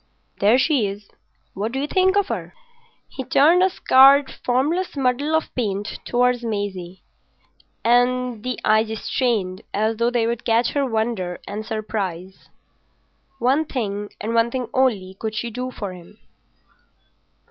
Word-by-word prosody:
There 210 +5 +5
she 265 -5 +2
is. 200 +1 -8 0.4
What 215 +4 -3
do 265 - -1
you 280 - -1
think 375 +4 +2
of 405 -1 +1
her?" - - -5 0.5
He 265 - -7
turned 305 +7 +4
a 375 - +4
scarred 275 -4 +5
formless 295 +8 0
muddle 275 +4 +1
of 320 - -1
paint 205 -3 -3
towards 245 0 +1
Maisie, 195 -5 -4 0.8
and 245 0 +2
the 255 -1 -3
eyes 215 +1 +3
strained 210 -8 -1
as 220 +2 0
though 235 +1 +2
they 240 -2 0
would 235 0 -2
catch 230 +1 +2
her 280 -2 0
wonder 220 -6 -2
and 210 +1 -5
surprise. 195 -5 -5 0.9
One 265 +5 +2
thing 210 -8 -4
and 225 +2 -3
one 230 0 +3
thing 250 -1 -4
only 210 -8 +1
could 220 -1 -4
she 235 +2 -3
do 250 +3 -4
for 205 -6 -6
him. 175 -2 -14
235 Hz, 145 wpm, -22 LUFS, 210-260 Hz, 0.9 s, There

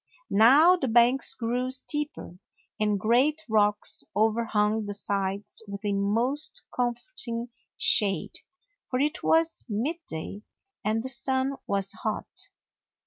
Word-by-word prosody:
Now 280 - +6
the 270 - -2
banks 240 +3 +4
grew 245 +2 -2
steeper, 260 - -3 0.4
and 210 -1 +1
great 260 +9 +2
rocks 210 -2 +2
overhung 215 0 +1
the 205 0 -4
sides 200 0 -2
with 200 +1 -7
a 205 - 0
most 235 +10 +2
comfort 245 - -3
ing 235 +1 -4 0.3
shade, 195 -6 +1 0.5
for 255 - -1
it 295 +2 0
was 325 0 +2
midday 215 - -4 0.4
and 220 +1 0
the 260 - -3
sun 265 +1 -1
was 200 0 0
hot. - - -4
230 Hz, 120 wpm, -27 LUFS, 205-265 Hz, 0.5 s, Now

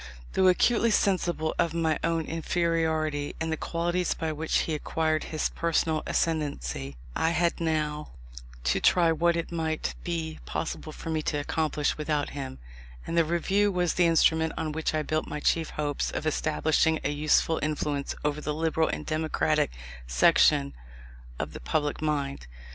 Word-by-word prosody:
Though 190 - +4
acutely 230 +5 +4
sensible 175 -6 +1
of 165 -1 +1
my 160 -2 +1
own 165 -1 0
inferiority 160 -3 0
in 160 0 -2
the - - +1
qualities 175 +2 -1
by 160 -1 -2
which 155 +1 0
he 160 - -2
acquired 155 +1 0
his 155 - -1
personal 160 -1 0
ascendancy, 70 - -1 0.2
I 160 - +2
had 170 0 +1
now 155 -2 -1 0.5
to - - +2
try 170 -2 +4
what 170 +2 +2
it 170 0 -3
might 160 -2 -2
be 160 -2 -3
possible 160 -1 -4
for 160 - -6
me 155 -1 0
to 150 - -1
accomplish 150 0 -1
without 150 -1 -1
him: 135 -2 -6 0.5
and 165 - -3
the 170 - +5
Review 190 +5 +1
was 180 -2 +1
the 175 -2 +3
instrument 160 0 +3
on 155 - -2
which 155 0 -1
I 155 - 0
built 155 +1 -1
my - - -4
chief 160 +1 +1
hopes 145 -2 -2
of - - -4
establishing 155 +1 +2
a - - 0
useful 155 +2 +2
influence 150 -2 -2
over 150 0 0
the 150 0 -2
liberal 160 0 +1
and - - -4
democratic 155 - +1 0.4
section 65 +2 +4 0.6
of - - -4
the - - -7
public 145 - -1
mind. 140 - -2
160 Hz, 160 wpm, -27 LUFS, 150-165 Hz, 0.6 s, the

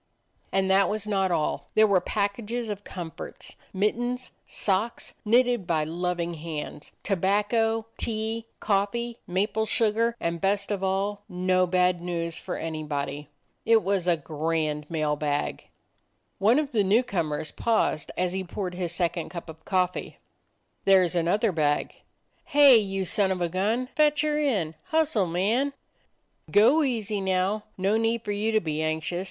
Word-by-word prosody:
And 195 0 +1
that 195 +1 +4
was 215 0 -2
not 195 -3 +1
all: 155 -4 -1
there 220 - +7
were 200 -4 +3
packages 215 +3 -2
of 205 -1 -5
comforts; 175 -5 -7 0.2
mittens, 240 +6 -1 0.2
socks, 205 +4 -1
knitted 240 -3 +3
by 160 -2 +1
loving 175 +1 -2
hands; 155 -2 -6
tobacco, 210 +4 +1
tea, 225 0 -3
coffee, 225 +4 -1
maple 210 +4 0
sugar; 230 +2 +1
and, 170 0 -2
best 200 +1 0
of 195 -2 -2
all, 195 +2 -1
no 185 0 +2
bad 180 -1 +2
news 170 -2 -3
for - - -5
anybody. 150 -2 -4 0.3
It 225 -1 +4
was 195 -2 0
a 175 -2 +4
grand 155 0 -2
mail 155 -2 0
bag. 145 -1 -2 0.7
One 220 +6 +4
of 300 -2 0
the 215 -5 +2
new 210 +6 +4
comers 155 -9 -2
paused 220 -9 0
as 180 0 0
he 190 0 -2
poured 180 0 -4
his 175 -2 -3
second 175 -1 -1
cup 170 -2 -7
of 160 0 -11
coffee: 185 -2 -1 0.7
"There 190 -2 +6
's 175 - -5
another 185 +6 +2
bag." 150 -3 0 0.5
"Hey, 285 -4 +7
you 195 -3 -1
son 195 +2 +1
of 185 - -1
a 175 -1 0
gun! 210 +8 0
Fetch 300 -1 +4
her 300 -1 +1
in. 205 - 0
Hustle, 310 - +1
man!" 220 +12 +1 0.8
"Go 230 +10 +5
easy 220 -7 -1
now. 190 +2 0
No 195 +3 +2
need 225 0 0
for 205 - -3
you 210 +2 0
to 220 - +4
be 155 -4 -3
anxious. 160 +2 -1
195 Hz, 155 wpm, -26 LUFS, 170-220 Hz, 0.8 s, there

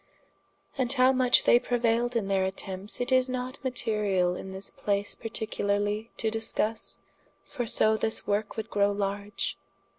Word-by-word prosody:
And 250 -1 +1
how 260 -1 +5
much 255 -1 +4
they 240 - +6
preuailed 240 0 0
in 220 -4 0
their 195 -1 +1
attempts, 190 +1 -3
it 245 +1 -2
is 255 0 +4
not 255 +1 -4
materiall 210 -8 +1
in 190 - -7
this 190 +1 -5
place 200 0 -1
particularly 210 -1 -2
to 220 - 0
discusse, 225 0 -1 0.5
for 245 -2 -5
so 220 0 +4
this 220 +1 -1
worke 205 +1 -1
would 220 0 -5
growe 205 0 +2
large. 200 +1 -3
220 Hz, 150 wpm, -28 LUFS, 200-245 Hz, 0.5 s, they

